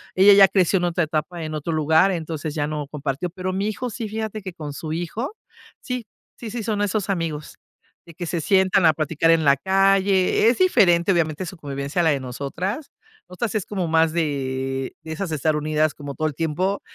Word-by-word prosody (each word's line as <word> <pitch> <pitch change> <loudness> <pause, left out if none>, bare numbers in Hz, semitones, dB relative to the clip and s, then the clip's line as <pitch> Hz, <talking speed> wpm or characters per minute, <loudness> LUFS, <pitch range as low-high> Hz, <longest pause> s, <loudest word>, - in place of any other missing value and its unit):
ella 195 +2 +7
ya 195 -1 +8
creció 190 0 +2
en 175 - 0
otra 175 0 +1
etapa, 160 +2 -3
en 155 0 -5
otro 155 +2 -3
lugar, 160 +4 +3
entonces 160 -3 -4
ya 145 -2 -1
no 150 -2 -4
compartió. 145 +3 -3
Pero 185 +1 -4
mi 195 +2 -1
hijo 245 +4 -3
sí, 225 -1 -5
fíjate 220 0 -4
que 190 -2 -7
con 150 -3 -7
su 155 +2 -6
hijo 175 - -4 0.5
sí 250 -2 -4 0.3
sí, 230 - -8
sí, 235 0 -4
son 210 -1 -1
esos 205 0 -1
amigos 165 -5 -3 0.5
de 170 - -13
que 175 +2 -6
se 170 0 -2
sientan 190 +1 +3
a 160 - +6
platicar 160 +2 +1
en 165 -1 +3
la 140 -1 +5
calle. 195 +4 +3
Es 250 - 0
diferente, 190 - +4
obviamente, 165 0 0
su 180 +2 -8
convivencia 140 +2 -3
a - - +1
la 160 - +4
de 140 - 0
nosotras. 155 - -4 0.4
Nosotras 205 +5 -4
es 210 - -1
como 190 -5 -3
más 160 0 +3
de 135 -4 -2
de 160 - -8
esas 170 +2 -4
estar 155 0 0
unidas 155 0 +1
como 145 -1 -7
todo 155 0 0
el 150 - -5
tiempo. 180 +5 -1
170 Hz, 210 wpm, -22 LUFS, 155-195 Hz, 0.5 s, ya